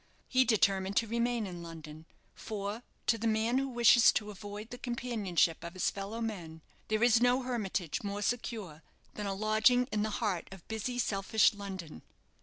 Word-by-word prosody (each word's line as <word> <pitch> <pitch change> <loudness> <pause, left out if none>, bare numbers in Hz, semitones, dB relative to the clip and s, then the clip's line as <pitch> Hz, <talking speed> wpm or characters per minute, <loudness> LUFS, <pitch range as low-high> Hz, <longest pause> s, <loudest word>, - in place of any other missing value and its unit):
He 260 -1 +3
determined 195 -4 +2
to 230 - +3
remain 235 0 0
in 175 -3 -7
London; 160 -1 -10 0.3
for, 205 +1 -5 0.2
to 230 - +2
the 230 - 0
man 225 +3 +2
who 270 - -1
wishes 240 -1 +6
to 210 -1 -2
avoid 205 +2 -8
the 245 - -7
companionship 215 -10 0
of 170 +2 -7
his 185 - +1
fellow 200 +4 -5
men, 170 -8 -5 0.2
there 215 +1 +1
is 240 -1 +5
no 245 +1 +3
hermitage 205 - -2
more 205 0 -3
secure 215 -9 -3 0.3
than 210 -1 -4
a 195 - -2
lodging 220 +4 +3
in 210 - 0
the 215 - 0
heart 195 -7 -1
of 190 -2 -12
busy, 225 +3 -3
selfish 215 -2 +2
London. 190 -6 -7
215 Hz, 175 wpm, -32 LUFS, 190-235 Hz, 0.3 s, wishes